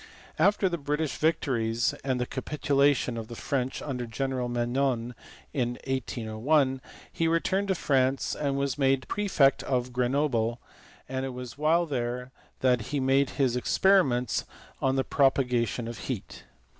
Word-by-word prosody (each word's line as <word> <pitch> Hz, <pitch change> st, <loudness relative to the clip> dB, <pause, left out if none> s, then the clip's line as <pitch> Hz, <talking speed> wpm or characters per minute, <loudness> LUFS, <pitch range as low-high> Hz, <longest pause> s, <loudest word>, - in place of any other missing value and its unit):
After 200 Hz, -1 st, +4 dB
the 170 Hz, -2 st, -2 dB
British 150 Hz, +1 st, -2 dB
victories 120 Hz, -8 st, +1 dB
and 130 Hz, -2 st, 0 dB
the 125 Hz, -, 0 dB
capitulation 140 Hz, -3 st, +1 dB
of 110 Hz, -1 st, -5 dB
the 120 Hz, -, -8 dB
French 130 Hz, +1 st, -2 dB
under 125 Hz, -4 st, -4 dB
General 130 Hz, +1 st, -2 dB
Menou 120 Hz, 0 st, 0 dB, 0.4 s
in 125 Hz, -4 st, -1 dB
1801, 130 Hz, +2 st, 0 dB, 0.3 s
he 165 Hz, -, +1 dB
returned 185 Hz, +4 st, +1 dB
to 190 Hz, -, +1 dB
France 135 Hz, -4 st, +1 dB
and 140 Hz, -2 st, -1 dB
was 140 Hz, -1 st, -1 dB
made 135 Hz, -1 st, +2 dB
prefect 180 Hz, -10 st, +2 dB
of 125 Hz, -1 st, -1 dB
Grenoble, 125 Hz, -2 st, +1 dB, 0.5 s
and 130 Hz, 0 st, -3 dB
it 130 Hz, -2 st, -4 dB
was 125 Hz, -1 st, -7 dB
while 160 Hz, +4 st, +2 dB
there 125 Hz, -3 st, -3 dB, 0.3 s
that 125 Hz, -4 st, +2 dB
he 145 Hz, -, -1 dB
made 135 Hz, +1 st, +3 dB
his 130 Hz, -4 st, +2 dB
experi 190 Hz, +9 st, +4 dB
ments 125 Hz, -2 st, -1 dB, 0.4 s
on 135 Hz, 0 st, +2 dB
the 135 Hz, -, +2 dB
propagation 125 Hz, -4 st, +1 dB
of 115 Hz, -4 st, -6 dB
heat. 85 Hz, -, -6 dB
130 Hz, 145 wpm, -28 LUFS, 120-145 Hz, 0.5 s, After